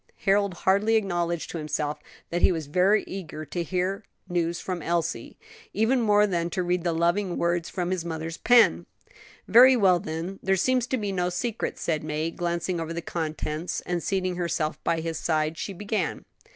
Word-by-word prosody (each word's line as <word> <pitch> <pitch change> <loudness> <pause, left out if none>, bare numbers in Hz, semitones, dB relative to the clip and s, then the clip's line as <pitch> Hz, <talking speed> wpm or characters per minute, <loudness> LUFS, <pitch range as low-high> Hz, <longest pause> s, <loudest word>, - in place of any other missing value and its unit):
Harold 200 -1 +3
hardly 200 +5 +2
acknowledged 175 -5 -1
to 170 - -4
himself 150 -1 -2 0.3
that 175 +1 -1
he - - +5
was 160 -3 -3
very 185 +8 +3
eager 155 -5 -7
to 170 +5 -4
hear 185 +4 -2 0.2
news 170 -1 -1
from 180 -2 -4
Elsie; 170 0 -2 0.4
even 240 +4 +2
more 210 -2 +4
than 170 -4 -1
to 180 +2 -2
read 175 0 0
the 175 - +1
loving 175 +3 0
words 170 0 0
from 180 -1 -2
his 185 -3 -1
mother's 165 -1 -5
pen. 245 -1 +4 0.6
"Very 255 +3 +8
well, 185 -5 +4
then; 170 +1 -5
there 195 0 +2
seems 250 +5 +1
to 260 - 0
be 205 -3 -2
no 180 -2 0
secret," 215 +6 -3
said 155 -3 -1
May, 155 +1 -2
glancing 175 +1 -2
over 165 0 -4
the 170 - -4
contents; 155 0 -3
and 175 -1 -2
seating 185 -1 -1
herself 170 -3 -2
by 165 -1 0
his 165 0 -3
side 155 -1 0
she 200 - -5
began. 200 -1 -3
175 Hz, 180 wpm, -26 LUFS, 165-195 Hz, 0.6 s, Very